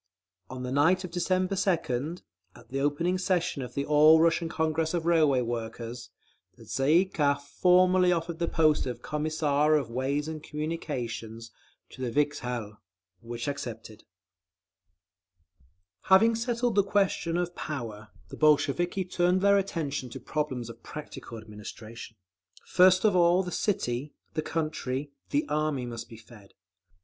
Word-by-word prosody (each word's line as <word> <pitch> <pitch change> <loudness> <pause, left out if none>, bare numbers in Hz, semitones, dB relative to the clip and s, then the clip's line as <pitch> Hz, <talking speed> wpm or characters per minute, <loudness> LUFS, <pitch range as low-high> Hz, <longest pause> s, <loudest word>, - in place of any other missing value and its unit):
_ - - -64 0.5
On 130 - -6
the 125 - -4
night 165 +7 +3
of 180 - -6
December 185 +2 0
2d, 165 -5 -1 0.3
at - - -17
the 135 - -3
opening 165 +6 0
session 180 -5 0
of 125 - -7
the 140 - -1
All 155 +2 +6
Russian 165 0 +2
Congress 160 0 0
of 165 -1 -2
Railway 155 -6 +4
Workers, 115 0 -5 0.5
the - - -14
Tsay 135 +3 +1
ee - - 0
kah 145 -6 +1
formally 180 +5 +3
offered 170 -1 -2
the 170 - 0
post 155 -4 +2
of 120 -1 -6
Commissar 150 -1 +1
of 135 -6 -1
Ways 135 +4 -1
and 160 -1 -5
Communications 120 -8 -5 0.4
to - - -11
the 125 - -1
Vikzhel—which 115 -6 -4
accepted…. 115 -6 -6 2.0
Having 205 +5 +6
settled 235 +1 -1
the 200 0 +4
question 195 -4 0
of 175 0 -2
power, 115 -8 -6 0.2
the - - -9
Bolsheviki 155 +5 +2
turned 180 +1 +1
their 200 0 +5
attention 150 -9 -3
to - - -8
problems 135 -6 -3
of 115 0 -11
practical 150 -5 -9
administration. 110 +1 -10 0.5
First 185 +2 +5
of 205 -3 +4
all 175 +1 +4
the 180 - -6
city, 145 - -2 0.2
the 155 - -1
country, 150 -4 -3 0.2
the 145 +2 0
Army 150 -3 -1
must 120 -1 -7
be 115 - -11
fed. 110 -3 -17
150 Hz, 145 wpm, -28 LUFS, 125-175 Hz, 2.0 s, All